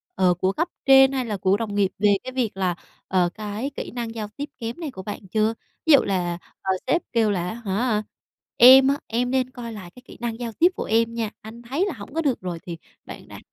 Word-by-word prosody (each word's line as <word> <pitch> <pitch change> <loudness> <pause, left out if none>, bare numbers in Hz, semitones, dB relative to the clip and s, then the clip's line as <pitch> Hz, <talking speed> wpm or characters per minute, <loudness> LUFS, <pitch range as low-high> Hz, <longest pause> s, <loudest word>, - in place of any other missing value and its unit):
ờ, 185 -1 +3
của 185 +2 0
cấp 335 - -1 0.2
trên 270 0 +7
hay 260 -2 -1
là 210 -3 -3
của 190 +2 +2
đồng 215 -2 -4
nghiệp 200 -2 +2
về 205 -1 +4
cái 255 - -6
việc 235 -7 -1
là, 185 -2 0 0.3
ờ, 180 -2 +2
cái 215 +6 -4
kỹ - - -5
năng 235 -2 -5
giao 215 -2 -4
tiếp 290 +1 -4
kém 230 +6 -5
này 315 -5 -4
của 190 -6 -9
bạn 205 -1 -7
chưa? 215 +3 +1 0.3
Ví 320 - +6
dụ 275 - +9
là, 175 -3 -1 0.2
ờ, 190 - -1 0.2
sếp 335 +6 +2
kêu 225 -3 +3
là 180 -2 -1
á - - -4
hả, 215 +2 0 0.5
"Em 260 +2 +9
á, 280 - +2
em 245 +2 -1
nên 255 -1 +1
coi 240 -3 -8
lại 185 -5 -9
cái 250 - -15
kỹ - - -13
năng 235 -1 -3
giao 235 -1 -4
tiếp 345 - +4
của - - -3
em 230 +1 +1
nha, 230 -2 -2
anh 225 +2 -11
thấy 275 +10 -1
là 390 - -3
hổng 215 +3 -11
có 325 - 0
được 275 -5 0
rồi" 175 -2 -4
thì 170 -2 -7 0.3
bạn - - -10
đã - - -10
225 Hz, 255 wpm, -23 LUFS, 200-255 Hz, 0.5 s, dụ